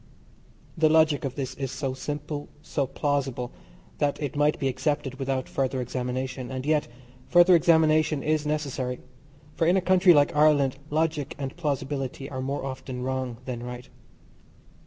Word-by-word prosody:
The 160 -2 +4
logic 155 -2 +4
of 135 - -4
this 135 -2 -3
is 135 -1 -4
so 135 -2 -3
simple, 145 +2 -5
so 140 -3 -1
plausible, 135 -3 -1 0.5
that 145 -1 0
it 145 -2 -3
might 150 +1 +2
be 135 - -1
accepted 135 0 -2
without 135 -1 -1
further 130 -1 -1
examination, 125 +1 -3
and 130 0 -5
yet 150 0 +2 0.4
further 175 +1 +6
examination 155 -3 +3
is 155 -1 +1
necessary, 140 -4 -2 0.5
for 165 - +1
in 180 +3 +4
a - - +4
country 185 -1 +5
like 145 0 +3
Ireland 145 -3 +4
logic 155 -2 -1
and 135 -2 -5
plausibility 135 -4 -3
are 130 -1 -4
more 135 +1 -3
often 130 -1 -5
wrong 130 -2 -2
than 125 -2 -4
right. 125 0 -7
140 Hz, 155 wpm, -26 LUFS, 130-155 Hz, 0.5 s, further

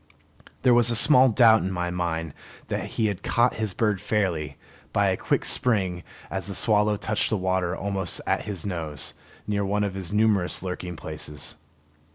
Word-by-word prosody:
There 125 -2 +5
was 120 0 +5
small 130 +1 +6
doubt 110 -1 +5
in 95 - -2
my 90 -1 -2
mind 80 -3 -3 0.4
that - - -2
he 115 - -2
had 100 -4 -2
caught 120 +1 +1
his 105 -4 -3
bird 105 -4 0
fairly, 85 -10 -1 0.3
by - - +2
a - - +1
quick - - -1
spring 95 -7 +1 0.3
as 95 0 -3
the 100 - -3
swallow 105 0 +3
touched 105 +1 -1
the 110 - 0
water 95 -1 -1
almost 95 -2 -2
at - - -1
his 100 -4 -5
nose, 80 -8 -2 0.3
near 100 -1 -1
one 105 +1 0
of 100 -2 -2
his 95 -2 -6
numerous 105 -4 +2
lurking 90 -1 -5
places. 75 -2 -4
95 Hz, 175 wpm, -25 LUFS, 90-105 Hz, 0.4 s, small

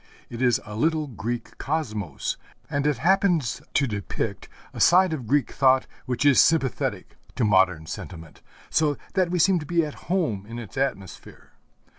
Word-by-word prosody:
It 120 +1 -6
is 125 -3 +3
a 105 - -8
little 155 +6 +1
Greek 120 -1 -5
cosmos, 110 - -3 0.4
and 140 +1 0
it 150 -4 +1
happens 175 - +2
to 140 - +3
depict 105 -5 -4 0.2
a - - -8
side 185 -1 +5
of 130 -7 -5
Greek 145 +2 +1
thought 130 -1 +3 0.2
which 125 +2 -1
is 140 -3 +7
sympathetic 145 -7 0 0.2
to - - 0
modern 95 -5 +3
sentiment, 80 0 -9 0.3
so 150 -3 +2 0.2
that 185 -3 +2
we 180 - -1
seem 180 +2 +4
to 150 - -7
be 170 -2 +2
at 150 - -10
home 135 - 0
in 115 +1 -7
its 120 -2 -9
atmosphere. 115 -10 -4
135 Hz, 165 wpm, -25 LUFS, 110-160 Hz, 0.4 s, is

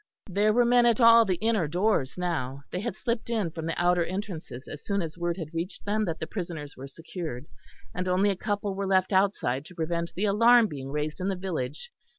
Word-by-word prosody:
There 205 +3 +2
were 240 +2 +4
men 240 0 +5
at 235 -1 +3
all 230 -1 +8
the 185 -3 +1
inner 215 -3 +1
doors 175 -4 0
now; 140 -7 -2
they 180 - -2
had 235 +4 -3
slipped 235 -2 -3
in 215 -8 0
from 160 0 -5
the 165 - -2
outer 175 0 +3
entrances 175 - -6
as 145 - -8
soon 200 -1 -1
as 160 -1 -6
word 175 0 -2
had 165 -3 -6
reached 170 +4 -4
them 210 +1 +1
that 165 -3 -3
the - - -3
prisoners 165 -5 -6
were 135 +1 -8
secured, 160 -3 -7 0.5
and 180 +1 -3
only 190 +3 +3
a - - -2
couple 205 0 -2
were 195 0 -3
left 190 0 +2
outside 190 -9 +1
to 180 - -12
prevent 170 +1 -2
the 200 - 0
alarm 230 +3 +6
being 135 -8 -6
raised 150 +3 -3
in 185 - -1
the 195 - 0
village. 175 - -4
180 Hz, 220 wpm, -27 LUFS, 160-205 Hz, 0.5 s, all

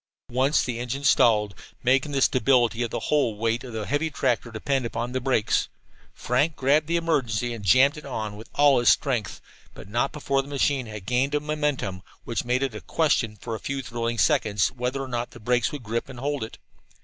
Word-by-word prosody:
Once 130 +5 +2
the 120 -2 -3
engine 125 +3 -4
stalled, 105 -6 +4 0.3
making 135 +3 +2
the 135 -2 +2
stability 125 -2 +3
of 120 - 0
the - - -4
whole 140 -8 +2
weight 115 +2 0
of 125 - -8
the 110 -2 -4
heavy 145 +6 0
tractor 125 -5 -1
depend 130 +4 -1
upon 120 +1 -3
the 130 0 -2
brakes. 125 -5 +1 0.4
Frank 145 +6 0
grabbed 145 +3 +2
the 170 - 0
emergency, 125 -8 0
and 110 -3 -8
jammed 130 +9 +5
it 150 - -9
on 110 -6 -4
with 110 +2 -11
all 145 -3 +5
his 120 - +4
strength, 125 -8 +1 0.4
but - - -11
not 120 +6 0
before 140 -2 0
the 135 - -13
machine 140 -2 0
had 105 -3 -8
gained 130 +6 +1
a - - +2
momentum 145 -11 -2 0.2
which 115 - -2
made 125 +2 0
it 135 -4 -2
a 105 - -7
question 140 -9 +1
for 115 - -5
a 110 - -4
few 140 -1 -4
thrilling 115 -1 -3
seconds 105 -2 +2
whether 125 +2 -3
or - - -6
not 120 -1 -3
the - - -13
brakes 120 +1 +1
would 145 -4 -7
grip 115 +4 -3
and 130 -2 -9
hold 145 -1 -2
it. 110 - -8
125 Hz, 210 wpm, -25 LUFS, 115-140 Hz, 0.4 s, jammed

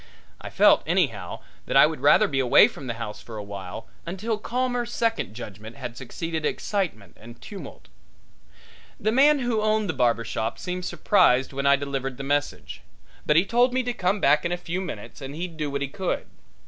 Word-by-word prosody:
I - - -7
felt, - - +5
anyhow, - - 0 0.3
that - - +2
I - - +9
would - - -2
rather - - +5
be 135 - -1
away 125 -2 +7
from 135 - -9
the 120 - -3
house 110 -2 -6
for 115 -2 -9
a 105 - -5
while, 100 +1 -7 0.2
until 210 +6 -3
calmer 245 +2 -1
second 230 - -2
judgment 110 -1 -9
had 125 -4 -7
succeeded 160 +6 -5
excitement 160 - -2
and 115 +2 -12
tumult. 200 -2 -10 1.1
The 215 - +1
man 285 +5 +5
who 240 -3 0
owned 215 -1 +1
the 170 - -1
barber 120 -3 +1
shop 110 +1 -3
seemed 180 0 -4
surprised 135 - +3
when 140 +1 -1
I 140 - +7
delivered 135 -2 -4
the 135 - -6
message, 145 +1 -2 0.5
but 150 - +4
he 170 +4 +5
told 245 +4 +2
me 260 - +2
to 245 0 -2
come 190 -1 0
back 150 -5 +4
in 170 - -1
a 175 - 0
few 175 +1 -4
minutes 175 -4 -7
and 135 +1 -7
he'd 170 +1 -5
do 150 -2 -3
what 140 0 -2
he - - -2
could. 185 +6 -3
155 Hz, 200 wpm, -25 LUFS, 125-210 Hz, 1.1 s, I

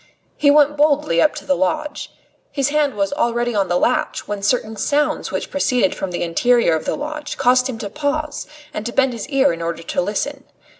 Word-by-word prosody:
He 285 - +3
went 295 0 +4
boldly 290 - +3
up - - +3
to - - -8
the 185 - +2
lodge. 295 - -2 0.4
His 275 -1 0
hand 290 -3 +1
was 200 +4 -1
already 240 -2 0
on 200 -3 +1
the 175 - +1
latch, - - 0
when 205 -1 -4
certain 220 +1 0
sounds 290 +8 0
which - - -4
proceeded 250 -7 +1
from 195 - -4
the 175 - -3
interior 235 +4 +2
of 160 - -4
the - - -1
lodge 300 0 -5
caused 250 +1 +3
him 245 - -4
to 215 - -5
pause 295 +5 -3 0.3
and 210 - -4
to - - -3
bend 265 -2 +2
his 230 +2 -6
ear 275 - +3
in 165 - -7
order 165 0 -4
to - - -1
listen. 270 +9 -3
250 Hz, 210 wpm, -20 LUFS, 200-290 Hz, 0.4 s, went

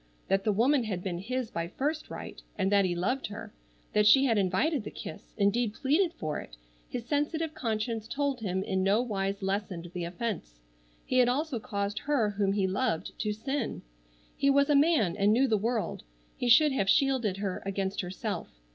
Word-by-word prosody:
That 195 0 +2
the 215 - +3
woman 245 +5 +3
had 185 -5 -3
been 175 -3 -3
his 250 +4 -3
by 170 0 -2
first 300 - -3
right, - - -8 0.2
and 195 -1 +1
that 200 -1 +5
he 175 -1 0
loved 250 +10 -1
her: 205 - -8 0.4
that 210 0 +4
she 270 +5 +7
had 235 -4 +3
invited 205 - +1
the - - -5
kiss, 205 - -9
indeed 210 +2 +1
pleaded 325 +6 +2
for 155 -1 -3
it, - - -11 0.3
his 240 -2 -5
sensitive 300 +4 -1
conscience 225 -2 -2
told 280 +1 -1
him 190 -3 -1
in 190 -1 -1
no 195 +3 +3
wise 195 -3 -2
lessened 190 -3 -3
the 175 -1 -3
offense. 175 - -4 0.5
He 255 - +2
had 245 -1 +5
also 275 -1 -1
caused 200 -1 -3
her 260 -8 +1
whom 200 -1 +1
he 200 -2 +1
loved 195 -2 -1
to 210 - 0
sin. 245 +4 -3 0.5
He 275 - +2
was 280 +1 +4
a - - +5
man 280 - +4
and 205 0 +3
knew 265 +4 +4
the 225 - +2
world. 225 +2 -1 0.3
He 245 - -1
should 290 +5 +7
have 200 -8 0
shielded 260 -9 +2
her 195 -2 -3
against 195 0 -2
herself. 180 - -5
215 Hz, 190 wpm, -29 LUFS, 195-265 Hz, 0.5 s, she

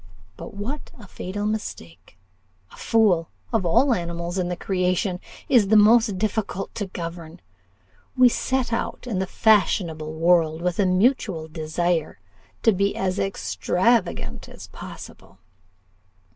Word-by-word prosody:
But - - -10
what 245 +9 -5
a 220 - -12
fatal 200 +3 -5
mistake! 95 - -6 0.5
a - - -14
fool, 195 -8 +2 0.2
of 205 -6 +1
all 255 +11 +4
animals 170 -1 -3
in 180 - -1
the 180 - -2
creation, 180 0 -1 0.3
is 230 -6 +4
the 215 +2 +5
most 215 -1 +5
difficult 200 -1 -2
to 205 - -4
govern. 170 -1 -7 0.8
We 255 0 +7
set 250 0 -1
out 230 - -3
in 220 -7 -2
the 190 - -1
fashionable 170 -8 +1
world 165 -1 +2
with 180 +1 -1
a 195 - +3
mutual 185 -4 +1
desire 160 +1 -2 0.5
to 225 - +6
be 200 0 0
as 190 0 -1
extravagant 195 +3 0
as - - -12
possible. - - -11
185 Hz, 130 wpm, -23 LUFS, 170-220 Hz, 0.8 s, We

